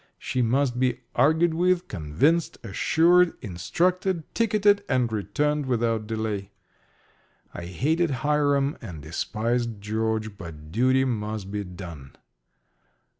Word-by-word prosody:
She 130 - -2
must 125 +1 +1
be 125 -1 +1
argued 160 +3 +3
with, 180 +1 +1
convinced, 115 - +1
assured, 170 - +3
instructed, 165 - -1
ticketed, 210 -3 +3
and 125 -4 +1
returned 145 +8 0
without 115 -3 0
delay. 110 -3 -3 1.0
I 85 - -6
hated 155 - +1 0.2
Hiram 145 -1 +2
and 85 - -8
despised 115 - -2
George; 110 0 -2
but 80 -4 -9
duty 130 +6 +3
must 105 -4 -3
be 105 0 -2
done. 85 -7 -10
120 Hz, 110 wpm, -25 LUFS, 100-150 Hz, 1.0 s, argued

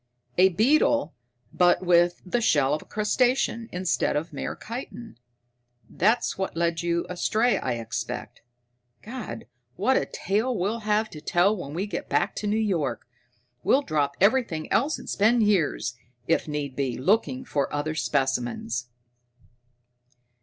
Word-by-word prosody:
A 190 +1 +7
beetle, 285 - +2 0.4
but 180 +1 +3
with 175 0 +3
the 235 +6 0
shell 145 -9 +3
of 150 - -1
a - - -15
crustacean 230 +1 0
instead 180 0 0
of 155 +3 -3
mere - - -4
chitin. 235 - -8 0.7
That's 220 +2 +1
what 190 -3 -3
led 170 -1 0
you 170 0 0
astray, 220 +6 +1
I 125 - -1
expect. 115 +1 -5 0.6
God, 220 - -7 0.3
what 260 +8 +2
a - - 0
tale 220 +5 -1
we'll 205 +6 -1
have 215 0 0
to 150 - -9
tell 175 +6 +2
when 150 -6 -7
we 185 +4 -1
get 210 - -5
back - - +1
to 210 - -2
New 210 +1 +1
York! 170 - -1 0.6
We'll 275 - +3
drop 145 - 0
everything 200 -6 +2
else, 285 +6 +2
and - - -11
spend 225 +3 +3
years, 185 -11 +1 0.3
if 165 - +1
need 145 -3 -4
be, 130 -3 -1
looking 225 - +1
for 140 - -1
other 145 +2 -2
specimens." 125 -5 -1
180 Hz, 145 wpm, -26 LUFS, 150-220 Hz, 0.7 s, A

